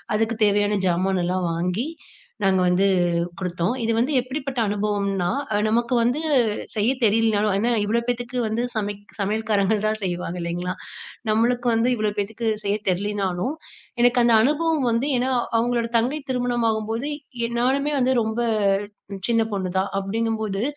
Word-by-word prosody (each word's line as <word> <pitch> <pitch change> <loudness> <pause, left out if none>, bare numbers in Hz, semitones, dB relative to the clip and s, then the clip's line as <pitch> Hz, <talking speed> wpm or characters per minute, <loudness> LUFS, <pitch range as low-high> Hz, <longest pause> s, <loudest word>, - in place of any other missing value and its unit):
அதுக்குத் 220 0 0
தேவையான 205 0 +2
ஜாமானெல்லாம் 180 0 0
வாங்கி, 180 - -1 0.6
நாங்க 190 -1 +3
வந்து 180 +2 +3 0.5
குடுத்தோம். 180 +2 -1
இது 225 - +1
வந்து 245 +6 +1
எப்படிப்பட்ட 265 0 -4
அனுபவம்னா, 200 -3 0 0.2
அ - - +2
நமக்கு 235 +3 +1
வந்து 245 +5 +1 0.5
செய்ய 215 +3 +2
தெரியலனாலும், 215 -1 +3
ஏன்னா 225 +4 +1
இவ்வளோ 225 +3 +1
பேத்துக்கு 245 +1 -2
வந்து 220 +2 -1
சமைக் 205 -1 -4
சமையல்காரங்க 210 0 +1
தான் 215 0 0
செய்வாங்க 180 -1 -3
இல்லைங்களா? 175 +1 -3 0.6
நம்மளுக்கு 240 +3 +2
வந்து 225 +2 +2
இவ்ளோ 215 -2 0
பேத்துக்கு 220 +3 -2 0.2
செய்ய 200 0 +1
தெர்லைனாலும், 195 +4 -1 0.5
எனக்கு 245 +1 +4
அந்த 235 -1 +4
அனுபவம் 300 +2 +1
வந்து 230 +5 +1
ஏன்னா 255 +2 0 0.3
அவங்களோட 235 0 0
தங்கை 255 +7 0
திருமணம் 245 -2 0
ஆகும்போது 225 +5 -2 0.4
எ - - -8
நானுமே 275 +4 +1
வந்து 260 0 +3
ரொம்ப 220 +1 -2 0.9
சின்ன 230 -1 +3
பொண்ணுதான். 190 0 -1
அப்டிங்கும்போது 220 0 -2
220 Hz, 135 wpm, -23 LUFS, 195-240 Hz, 0.9 s, எனக்கு